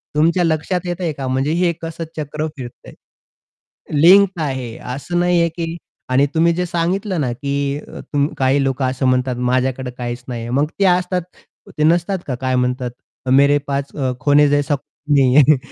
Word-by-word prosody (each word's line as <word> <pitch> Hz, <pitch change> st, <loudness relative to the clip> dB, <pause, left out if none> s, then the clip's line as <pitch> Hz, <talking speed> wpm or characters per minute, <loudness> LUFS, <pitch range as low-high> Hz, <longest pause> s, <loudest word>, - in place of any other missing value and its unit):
तुमच्या 170 Hz, +4 st, +3 dB
लक्षात 165 Hz, +2 st, 0 dB
येतंय 175 Hz, -1 st, -2 dB
का? 135 Hz, -2 st, -5 dB
म्हणजे 130 Hz, +3 st, 0 dB
हे 175 Hz, 0 st, +2 dB
कसं 165 Hz, 0 st, -5 dB
चक्र 150 Hz, +1 st, -3 dB
फिरतंय? 120 Hz, -2 st, -10 dB, 1.1 s
लिंक्ड 190 Hz, +1 st, +6 dB
आहे 130 Hz, -5 st, -4 dB, 0.2 s
असं 175 Hz, +6 st, -3 dB
नाहीये 175 Hz, -1 st, +3 dB
की 165 Hz, 0 st, -5 dB, 0.3 s
आणि 135 Hz, +3 st, +4 dB
तुम्ही 170 Hz, +1 st, +3 dB
जे 180 Hz, +1 st, -1 dB
सांगितलं 180 Hz, +2 st, -1 dB
ना 125 Hz, -4 st, -1 dB
की 140 Hz, +2 st, -2 dB, 0.2 s
तु 145 Hz, -1 st, -1 dB
काही 135 Hz, +1 st, +2 dB
लोकं 135 Hz, 0 st, -1 dB
असं 130 Hz, 0 st, -1 dB
म्हणतात 125 Hz, 0 st, +1 dB
माझ्याकडे 130 Hz, 0 st, 0 dB
काहीच 120 Hz, 0 st, -5 dB
नाहीये. 120 Hz, -1 st, -5 dB
मग 140 Hz, +4 st, +2 dB
ते 195 Hz, -, +4 dB
असतात 180 Hz, 0 st, +2 dB, 0.6 s
ते -, -, +1 dB
नसतात 175 Hz, +4 st, +2 dB
का 130 Hz, -, -2 dB
काय 130 Hz, -1 st, 0 dB
म्हणतात 125 Hz, 0 st, -1 dB, 0.4 s
मेरे 140 Hz, +2 st, +5 dB
पास 140 Hz, 0 st, -3 dB
अ, 130 Hz, -3 st, -1 dB
खोने 145 Hz, 0 st, +4 dB
जैसा 145 Hz, 0 st, +1 dB
कूछ 145 Hz, +2 st, -7 dB
नहीं 130 Hz, -2 st, +4 dB
है 150 Hz, 0 st, +6 dB
145 Hz, 170 wpm, -19 LUFS, 130-170 Hz, 1.1 s, लिंक्ड